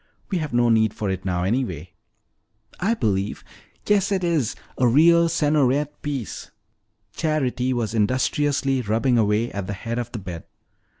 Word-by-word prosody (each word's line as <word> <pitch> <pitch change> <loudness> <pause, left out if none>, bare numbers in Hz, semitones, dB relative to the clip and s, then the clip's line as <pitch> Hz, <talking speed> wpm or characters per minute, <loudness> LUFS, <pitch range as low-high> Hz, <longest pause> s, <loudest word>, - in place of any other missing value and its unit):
"We 185 - +1
have 155 -2 -4
no 120 0 +3
need 110 -2 +3
for 100 -3 -2
it 95 - -5
now, 90 -2 -1
anyway." 95 - -2 0.9
"I 220 +6 +1
believe 100 - -1 0.4
yes, 205 -1 +2
it 190 -2 0
is! 160 -10 0 0.2
A 125 - +4
real 170 +6 +5
Sergnoret 150 -2 +1
piece!" 140 -6 -5 0.6
Charity 130 -5 0
was 115 -3 -1
industriously 135 +4 +1
rubbing 115 +3 +1
away 110 +2 +1
at 100 -2 -5
the 100 - -3
head 115 +4 -4
of 120 - -5
the - - -5
bed. 90 -5 -7
125 Hz, 155 wpm, -23 LUFS, 105-150 Hz, 0.9 s, real